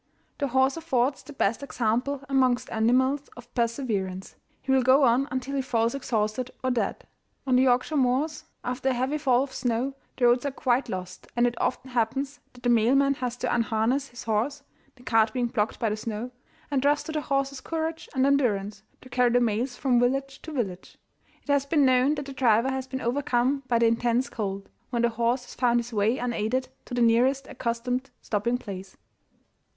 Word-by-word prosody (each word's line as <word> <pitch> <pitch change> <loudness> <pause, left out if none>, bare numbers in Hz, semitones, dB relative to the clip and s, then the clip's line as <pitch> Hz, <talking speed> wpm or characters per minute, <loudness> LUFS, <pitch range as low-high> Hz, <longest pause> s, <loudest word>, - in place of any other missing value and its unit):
The 285 - +1
horse 265 +3 +2
affords 270 -4 0
the - - -12
best 230 -5 0
example 255 +2 -1
amongst 260 -3 +2
animals 260 +5 +2
of 240 0 -13
perseverance: 225 -6 -2 0.2
he 270 - -3
will 265 -1 +5
go 260 +3 +5
on 255 +2 +3
until 260 +2 -3
he 275 - +1
falls 230 -3 0
exhausted 235 -2 -1
or 255 - +1
dead. 225 -5 -2 0.4
On 260 -2 +2
the 250 - +5
Yorkshire 255 +4 +2
moors, 275 +4 +1 0.2
after 250 +2 -1
a - - +2
heavy 260 +5 -1
fall 260 -3 +3
of 270 -1 -8
snow, 245 +2 -1 0.2
the 250 - +2
roads 240 +1 +4
are 285 - 0
quite 260 0 0
lost, 185 0 -6
and 240 0 +3
it 240 - +1
often 260 +1 -2
happens 270 +4 -1
that 245 -1 -17
the 245 - +2
mailman 260 +5 +4
has 250 -2 -4
to 250 - -1
unharness 235 +4 +1
his 240 -2 -10
horse 235 +7 -1 0.3
(the 250 - -18
cart 225 -3 +3
being 250 -1 0
blocked 225 -3 -1
by 225 - +1
the - - 0
snow), 220 +2 -5 0.4
and 275 -2 +1
trust 290 +2 +2
to - - -5
the 310 -1 -1
horse's 275 -1 -1
courage 320 +2 -3
and 260 0 +3
endurance 210 -8 +1 0.2
to 255 - -13
carry 245 0 +3
the 245 +1 +3
mails 240 +2 0
from 255 -4 +2
village 270 +2 0
to 320 - -8
village. 195 -10 -4 0.5
It 290 - -2
has 280 -1 +2
been 290 -1 +3
known 260 +3 +4
that 290 -1 -5
the 275 - -7
driver 245 -1 +3
has 265 0 -3
been 260 0 -5
overcome 255 +1 +1
by 240 - +2
the 230 - +3
intense 235 +2 +1
cold, 195 -3 -4 0.2
when 235 -2 0
the 235 - +4
horse 235 +2 0
has - - -11
found 240 -1 +2
his 235 0 -6
way 215 +4 +2
unaided 245 +1 -1 0.2
to 245 - -6
the 245 - +3
nearest 255 +4 +3
accustomed 250 +3 -3
stopping 235 +3 0
place. 195 -5 -9
250 Hz, 200 wpm, -26 LUFS, 230-270 Hz, 0.5 s, will